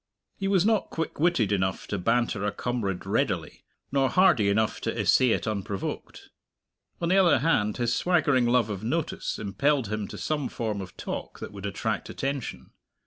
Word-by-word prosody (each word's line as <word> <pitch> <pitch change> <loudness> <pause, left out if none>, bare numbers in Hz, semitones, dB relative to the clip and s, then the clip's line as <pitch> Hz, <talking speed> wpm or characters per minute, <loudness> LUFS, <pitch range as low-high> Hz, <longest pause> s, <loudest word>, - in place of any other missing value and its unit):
He 195 - -3
was 195 -2 +3
not 220 -2 +2
quick 160 -2 -4
witted 140 - +2
enough 95 -2 0
to 100 - -2
banter 115 0 +1
a 105 - 0
comrade 110 -7 -3
readily, - - -1 0.3
nor 135 -1 +2
hardy 155 - +4
enough 110 +1 +1
to - - -2
essay 130 - +4
it - - +1
unprovoked; 100 -2 -4 0.7
on 170 - -1
the 190 - +4
other 180 -5 +5
hand, 115 -7 +1
his 120 -1 +1
swaggering 145 -9 +2
love 120 -3 +2
of 100 0 -5
notice 155 +7 -2
impelled 130 +4 0
him 105 -1 -2
to - - -8
some 150 -4 -2
form 110 -4 -3
of 95 - -10
talk - - -5
that - - -7
would 100 0 -6
attract 100 - -3
attention. 135 -2 -4
120 Hz, 175 wpm, -27 LUFS, 105-150 Hz, 0.7 s, other